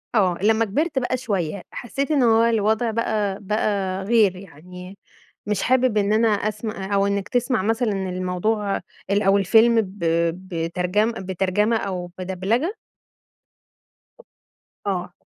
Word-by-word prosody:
آه، 185 -5 +3
لمّا 220 +2 +3
كبرت 285 - 0
بقى 255 0 -1
شوية، 195 -7 -2
حسيت 275 +5 -4
إن 285 -4 +3
هو 225 -1 +4
الوضع 225 0 +1
بقى 210 -3 -1
بقى 195 -2 -1
غير 210 -3 +3
يعني، 180 +2 -11 0.5
مش 210 0 -1
حابب 255 -3 +2
إن 205 0 +2
أنا 225 +1 +3
أسم 215 +1 -1
آآ 200 -1 -5
أو 200 0 +3
إنك 200 -1 -2
تسمع 245 -2 +1
مثلًا 225 +3 0
الموضوع 190 +2 -1 0.3
ال 200 +1 +2
أو 195 0 +4
الفيلم 225 +4 +4
ب 195 0 -9 0.3
بترجم 180 +4 -1
بترجمة 195 +2 0
أو 180 -4 -4
بدبلجة؟ 190 - -1 2.1
آه. 180 -2 -2
205 Hz, 130 wpm, -22 LUFS, 190-225 Hz, 2.1 s, هو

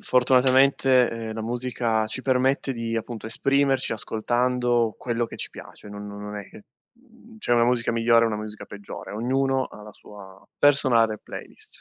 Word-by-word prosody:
Fortunatamente, 130 0 +4
ehm, 115 -1 -5
la 110 - -5
musica 120 -1 -1
ci 120 +4 -4
permette 130 +1 +1
di, 115 -1 -3
appunto, 115 0 -5
esprimerci 135 +1 +1
ascoltando 120 +1 0
quello 120 -1 -1
che - - -10
ci - - -3
piace. - - -12
Non 105 0 -8
non 100 0 -8
non 105 0 -6
è 100 -2 -7
che, - - -14 0.3
mhmm, 235 -2 -20
c'è 165 - -1
una 115 - +4
musica 120 -1 +1
migliore 115 0 +4
o - - 0
una 105 - -2
musica 105 0 -8
peggiore. 100 0 -9
Ognuno 130 +4 0
ha 105 - -12
la 105 0 -11
sua 95 -2 -14
personale 120 -7 +3
playlist. - - -10
120 Hz, 175 wpm, -24 LUFS, 110-130 Hz, 0.3 s, Fortunatamente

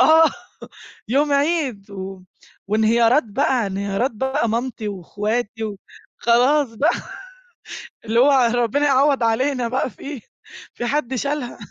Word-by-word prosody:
آه، 320 +5 +7 0.8
يوم 285 +4 +2
عيد 280 - 0
و 190 -1 -7 0.5
وانهيارات 230 +5 +3
بقى 225 +2 0
انهيارات 200 +6 -1
بقى 265 +2 -1
مامتي 230 -1 -3
واخواتي، 210 +4 -3 0.5
وخلاص 245 +2 +3
بقى 295 +9 +2 1.2
اللي 225 +2 +1
هو 280 +3 +6 0.2
ربنا 245 +5 +1
يعوض 275 -2 +3
علينا 250 +2 +1
بقى 255 +2 -1
في 270 +5 -8 0.5
في 240 - -5
حد 265 -1 -1
شالها 280 -1 -3
245 Hz, 115 wpm, -21 LUFS, 220-280 Hz, 1.2 s, آه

